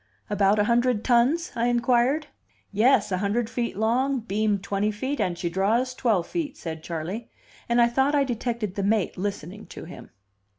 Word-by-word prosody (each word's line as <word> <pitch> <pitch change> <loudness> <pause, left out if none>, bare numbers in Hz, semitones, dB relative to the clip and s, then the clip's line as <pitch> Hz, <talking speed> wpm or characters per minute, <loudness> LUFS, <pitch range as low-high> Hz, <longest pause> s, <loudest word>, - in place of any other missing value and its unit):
"About 205 0 +3
a 210 - +3
hundred 235 0 +2
tons?" 265 +8 +2
I 235 +1 +1
inquired. 245 +5 +2 0.5
"Yes. 220 +1 +3
A 185 - 0
hundred 215 +3 -1
feet 235 -5 -3
long, 250 +5 +1
beam 215 -1 0
twenty 200 +2 -1
feet, 260 +7 -3
and 180 -4 -1
she 175 0 -2
draws 215 +9 +1
twelve 220 -9 +1
feet," 310 - -4
said 160 -2 -6
Charley; 170 +8 -5 0.4
and 235 +1 +3
I 235 - +6
thought 265 +4 +1
I 285 - +4
detected 235 -5 -3
the 200 - -3
mate 200 -1 +1
listening 200 +1 -5
to - - -9
him. 180 - -11
225 Hz, 175 wpm, -25 LUFS, 200-245 Hz, 0.5 s, I